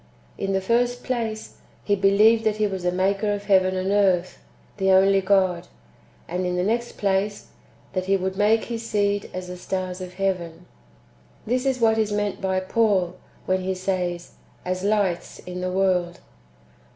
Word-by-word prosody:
^ - - -30 0.3
In 195 0 -2
the 190 - +1
first 245 +4 +1
place, 225 -4 -3 0.3
[he 205 - +2
believed] 210 +3 +4
that 215 -1 +1
He 215 0 +1
was 190 -2 -3
the 180 0 0
maker 195 +3 0
of 205 0 -3
heaven 190 -2 +3
and 185 +1 -1
earth, 190 -3 +2 0.4
the 190 -1 +1
only 195 +1 +5
God; 190 -2 +2 0.6
and 180 +2 -2
in 180 0 -1
the 180 - 0
next 235 +4 -1
place, 200 +1 -1 0.4
that 185 -1 -2
He 195 +1 +2
would 190 0 -3
make 210 +3 +3
his 230 -1 -5
seed 205 -2 0
as 185 0 -5
the 180 0 -7
stars 185 0 -4
of 180 0 -8
heaven. 180 -3 -2 0.8
This 250 +4 0
is 260 -1 0
what 225 -1 +3
is 215 -1 0
meant 205 -1 -2
by 190 -1 0
Paul, 190 -3 +1 0.3
[when 185 0 +1
he 190 0 -2
says,] 180 -2 -3 0.2
" - - -31
as 185 0 -3
lights 200 -4 0
in 180 0 -7
the 185 0 -2
world." 180 -2 0
195 Hz, 180 wpm, -24 LUFS, 185-210 Hz, 0.8 s, only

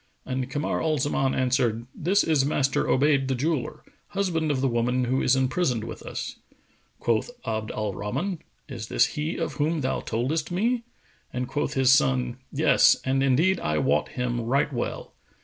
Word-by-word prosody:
And 130 0 -3
Kamar 145 +3 -1
al 155 -1 +1
Zaman 135 -1 0
answered, 125 -3 +1
"This 195 +6 +2
is 155 -4 +2
Master 135 -2 +1
Obayd 140 0 +3
the 135 - 0
jeweller, 150 +1 -2 0.2
husband 180 -6 -1
of 140 -3 +1
the 135 - +2
woman 125 +1 +1
who 130 +2 0
is 130 - +3
imprisoned 130 -2 0
with - - -7
us." - - -6 0.6
Quoth 115 - 0 0.2
Abd 110 -1 -2
al 105 -2 -3
Rahman, 165 - -3 0.3
"Is 120 -6 -6
this - - +3
he 155 +3 -2
of 165 - -2
whom 155 +1 0
thou 130 - -1
toldest 135 +8 -2
me?"; 230 +7 0 0.5
and 125 0 -3
quoth 145 - -2
his 130 -1 +4
son, 65 - +2
"Yes; - - +5
and 135 +1 +1
indeed 150 +8 +3
I 75 0 -1
wot - - +1
him 120 -1 -2
right 135 +5 +1
well." 120 - -4
135 Hz, 170 wpm, -26 LUFS, 120-155 Hz, 0.6 s, Yes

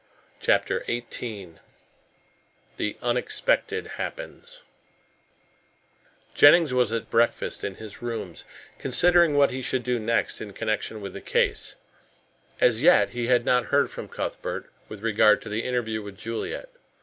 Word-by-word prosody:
CHAPTER - - +1
XVIII 110 -6 -5 1.2
THE 105 - -2
UNEXPECTED 435 - 0
HAPPENS - - -7 1.7
Jennings 165 -6 +6
was 125 -3 +2
at 115 -1 -3
breakfast 115 +1 +1
in 100 - -3
his 110 0 -11
rooms, 120 -1 -5 0.4
considering 170 +4 +3
what 140 -1 +4
he 130 - -4
should 130 0 -1
do 125 0 0
next 115 +1 -1
in 105 -2 -7
connection 110 0 -3
with 100 -2 -7
the - - -8
case. - - -1 0.8
As 115 -2 +3
yet 175 +4 +5
he 120 -1 -3
had 125 -1 +3
not 125 -1 +3
heard 140 0 +2
from - - -7
Cuthbert - - -5 0.2
with 105 -2 -9
regard 110 -2 +4
to - - -8
the 105 +2 -2
interview 115 -3 -2
with 100 -1 -10
Juliet. 115 - -5
120 Hz, 135 wpm, -25 LUFS, 110-140 Hz, 1.7 s, Jennings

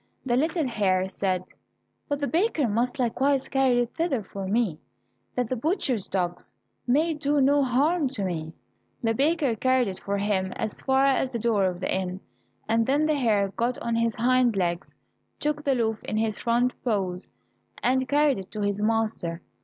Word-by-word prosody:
The 240 -2 +1
little 315 +2 +1
hare 190 -5 +1
said, 185 -1 -2 0.6
"But 285 0 -1
the 285 - 0
baker 330 - +1
must 235 +5 0
likewise 265 +2 +1
carry 265 -3 +2
it 240 - -3
thither 325 -9 0
for 195 0 -6
me, 200 -6 0 0.6
that 250 -2 0
the 255 - -2
butchers' 255 - 0
dogs 175 -2 -3 0.3
may 310 +7 +3
do 295 -1 0
no 285 +1 +4
harm 285 +5 +2
to 240 -7 -3
me." 160 -3 -3 0.5
The 225 0 +2
baker 285 -1 +1
carried 255 +1 +2
if 190 -1 -5
for 200 0 -2
him 195 -2 0
as 215 - -4
far 265 0 +3
as 265 -1 +2
the - - 0
door 220 -4 +1
of 180 -1 -2
the - - 0
inn, 185 0 -3 0.5
and 225 0 +2
then 285 +3 +2
the 310 - +2
hare 215 -8 +2
got 235 +5 -1
on 235 - -3
his 230 -1 +1
hind 250 -1 +3
legs, 175 -1 -2 0.4
took 300 0 -1
the 275 -2 +2
loaf 225 -2 -1
in 215 - -2
his 220 -1 0
front 240 +1 +1
paws, 190 -6 -1 0.6
and 260 +1 +1
carried 290 -4 +3
it 190 0 -9
to 215 - -4
his 205 0 -1
master. 215 -6 -1
235 Hz, 185 wpm, -26 LUFS, 200-270 Hz, 0.6 s, no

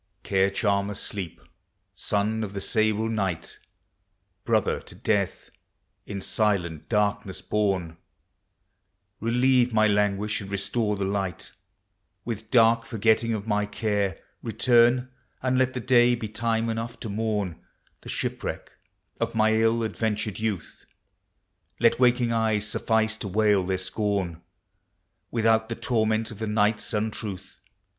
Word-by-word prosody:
Care 95 0 +2
charmer 100 0 0
Sleep, 95 -4 -4 0.5
son 105 +2 -1
of 100 -1 -6
the - - -2
sable 110 +1 +1
Night, 95 -7 -2 0.9
Brother - - +1
to - - -14
Death, 100 -3 -1 0.6
in 100 -1 -5
silent 95 -8 0
darkness 105 -3 0
born: 95 -6 -1 1.2
Relieve 125 +2 +3
my 110 -1 +4
languish 105 +1 +1
and 100 - -8
restore 105 +2 -1
the 100 -1 -2
light; 95 -3 -3 0.7
With 110 -2 -5
dark 115 -1 +5
forgetting 115 0 +1
of 105 -1 -5
my 105 -1 0
care, 105 -2 -1 0.2
return, 120 +2 +3 0.3
And 130 0 +2
let 130 0 +1
the - - -1
day 120 0 +4
be 115 -2 -5
time 115 +1 -1
enough 115 +1 -4
to - - -4
mourn 105 -4 -2 0.4
The - - -10
shipwreck - - -4 0.5
of - - -2
my 110 0 +4
ill 115 +1 +2
adventured 110 -2 -2
youth: 110 -6 -4 1.0
Let 115 +1 +4
waking 120 -1 +3
eyes 110 -2 +1
suffice 110 +1 +1
to 105 - -5
wail 105 0 +3
their 95 +1 -1
scorn 95 -3 -2 0.9
Without 110 -1 +2
the 115 - -2
torment 110 -2 0
of 110 - -10
the 110 - -2
night's 105 0 +1
untruth. 105 -3 -4
110 Hz, 130 wpm, -26 LUFS, 100-115 Hz, 1.2 s, dark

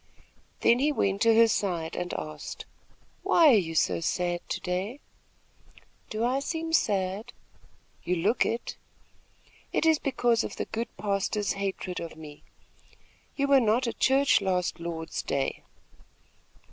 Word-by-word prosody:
Then 235 +1 +4
he 295 +3 +2
went 200 -8 0
to 230 -1 +5
her 230 0 +7
side 175 -7 -1
and 180 0 -3
asked: 155 -1 -6 0.6
"Why 330 -3 +5
are - - +7
you 165 -3 -4
so - - +2
sad 175 +1 -1
to - - -2
day?" 190 +8 -3 1.1
"Do 215 +1 -2
I 255 +3 +1
seem 325 +3 -4
sad?" 195 - 0 0.7
"You 180 - 0
look 200 +8 +2
it." 230 +2 -3 0.9
"It - - 0
is 320 -2 +4
because 240 -4 +1
of - - -5
the - - -3
good 230 +2 -3
pastor's 200 +1 -1
hatred 195 -2 -4
of 165 -1 -7
me. 150 -2 -11 0.9
You 280 - +1
were 280 -1 +5
not 230 +3 +2
at 235 - -4
Church 270 -3 +4
last 180 -2 -1
Lord's 165 -1 -4
day?" 135 -1 -2
200 Hz, 145 wpm, -28 LUFS, 180-245 Hz, 1.1 s, her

